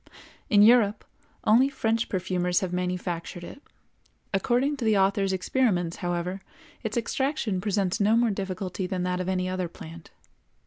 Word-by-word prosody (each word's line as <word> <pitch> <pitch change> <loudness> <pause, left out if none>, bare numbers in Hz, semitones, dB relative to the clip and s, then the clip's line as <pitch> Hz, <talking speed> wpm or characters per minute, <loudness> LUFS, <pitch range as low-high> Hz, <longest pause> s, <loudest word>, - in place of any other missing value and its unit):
In 205 -3 +6
Europe 220 -2 +4 0.4
only 245 +6 +5
French 225 -4 -1
perfumers 180 -1 0
have 185 -2 -3
manufactured 180 -1 -3
it; 275 - -10 0.7
according 250 +8 +1
to 260 - -5
the 215 -2 +3
author's 195 0 +2
experiments, 185 -3 0
however, 175 +2 -3 0.4
its 220 -1 -3
extraction 240 -5 -1
presents 200 0 0
no 215 +2 +4
more 235 -1 +3
difficulty 190 -1 -4
than 185 -1 -2
that 180 0 -1
of 185 - -3
any 185 -1 0
other 185 -1 -2
plant. 165 0 -11
190 Hz, 145 wpm, -26 LUFS, 180-225 Hz, 0.7 s, In